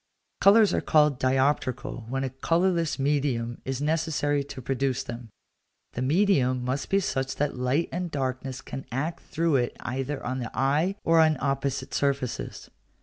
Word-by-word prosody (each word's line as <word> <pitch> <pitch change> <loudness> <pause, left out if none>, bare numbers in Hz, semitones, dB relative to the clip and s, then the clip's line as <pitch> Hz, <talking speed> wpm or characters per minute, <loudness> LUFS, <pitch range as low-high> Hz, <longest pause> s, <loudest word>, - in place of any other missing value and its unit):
Colours 210 +1 +6
are - - +1
called 150 -4 +3
dioptrical 130 -3 0
when 135 +1 -1
a 130 - -2
colourless 165 +4 +1
medium 135 -4 0
is 130 -1 -2
necessary 150 -2 0
to 140 -1 -9
produce 135 0 -1
them; 120 -1 -8 0.6
the 120 - -4
medium 130 -5 +2
must 130 +3 -2
be 195 - +3
such 135 -8 -2
that 145 0 -1
light 125 +6 0
and 180 0 -3
darkness 130 -2 -3
can 135 +2 -7
act 155 +7 -2
through 165 -3 +1
it 120 -1 -1
either 135 +3 -3
on 130 +1 -2
the 120 -3 -4
eye 150 +8 +2
or 165 0 +4
on 155 -2 +4
opposite 140 0 -2
surfaces. 140 -3 -2
135 Hz, 155 wpm, -27 LUFS, 130-155 Hz, 0.6 s, Colours